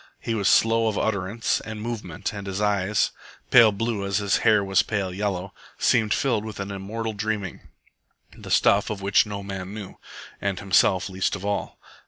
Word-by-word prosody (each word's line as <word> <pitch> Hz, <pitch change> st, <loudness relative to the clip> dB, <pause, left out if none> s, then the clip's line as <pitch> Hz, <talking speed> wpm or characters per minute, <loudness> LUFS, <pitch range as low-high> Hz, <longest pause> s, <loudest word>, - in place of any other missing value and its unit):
He 115 Hz, -, -3 dB
was 105 Hz, -3 st, 0 dB
slow 115 Hz, 0 st, +4 dB
of 110 Hz, -, -1 dB
utterance 105 Hz, +1 st, 0 dB
and 110 Hz, -1 st, -7 dB
movement, 105 Hz, -5 st, -5 dB
and 100 Hz, -1 st, -7 dB
his 95 Hz, 0 st, -3 dB
eyes, 105 Hz, -1 st, +1 dB, 0.4 s
pale 115 Hz, -3 st, +8 dB
blue 105 Hz, 0 st, -2 dB
as 100 Hz, 0 st, 0 dB
his 100 Hz, -2 st, +1 dB
hair 105 Hz, -2 st, +3 dB
was 95 Hz, -1 st, +3 dB
pale 100 Hz, -4 st, -2 dB
yellow, 100 Hz, -1 st, -3 dB, 0.2 s
seemed 110 Hz, -3 st, +2 dB
filled 115 Hz, -4 st, +1 dB
with 110 Hz, -2 st, -7 dB
an 100 Hz, 0 st, -4 dB
immortal 110 Hz, +3 st, -4 dB
dreaming, 105 Hz, -3 st, -4 dB, 0.7 s
the -, -, -11 dB
stuff 100 Hz, 0 st, +3 dB
of 100 Hz, -2 st, -5 dB
which 100 Hz, +2 st, +3 dB
no 100 Hz, -1 st, -5 dB
man 95 Hz, 0 st, -6 dB
knew, 100 Hz, -3 st, -8 dB, 0.4 s
and 100 Hz, -2 st, -1 dB
himself 95 Hz, -1 st, +3 dB
least 95 Hz, 0 st, -1 dB
of 100 Hz, 0 st, -7 dB
all. 100 Hz, 0 st, -2 dB
100 Hz, 180 wpm, -24 LUFS, 95-110 Hz, 0.7 s, pale